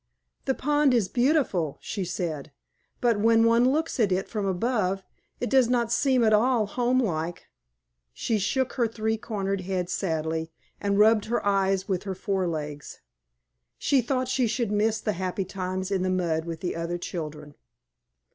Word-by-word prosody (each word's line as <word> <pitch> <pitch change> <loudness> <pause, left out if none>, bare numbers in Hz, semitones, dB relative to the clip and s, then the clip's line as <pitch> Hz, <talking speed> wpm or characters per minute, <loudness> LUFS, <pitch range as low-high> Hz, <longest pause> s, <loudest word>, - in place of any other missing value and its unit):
"The 265 - +1
pond 290 -2 +2
is 220 -6 +2
beautiful," 240 - +1
she 200 - -4
said; 160 -5 -4 0.5
"but 235 -4 +2
when 225 +1 +4
one 230 +2 +4
looks 315 +1 -1
at 210 -4 +3
it 185 +1 0
from 210 -3 -2
above, 195 -1 0 0.4
it 245 - -1
does 260 -2 +4
not 240 -2 +1
seem 255 0 +3
at 215 -1 +4
all 230 +1 +3
homelike." 205 -8 -1 0.7
She 215 - -1
shook 255 +5 0
her 240 -3 +1
three 220 0 -1
cornered 195 -3 -3
head 180 -1 -2
sadly, 160 -3 -2 0.3
and 200 -1 0
rubbed 215 0 +5
her 235 -1 -1
eyes 195 -1 +1
with 185 -3 0
her 190 -2 -3
forelegs. 165 -7 -3 0.8
She 275 -2 +2
thought 255 +1 -1
she 255 -1 +1
should 235 -1 -1
miss 215 +1 +1
the 210 - -1
happy 185 +1 -2
times 185 0 -4
in 190 -2 +1
the 185 - 0
mud 170 -3 0
with 165 -1 -6
the 180 - -2
other 170 +1 -2
children. 150 -4 -6
200 Hz, 165 wpm, -26 LUFS, 180-235 Hz, 0.8 s, rubbed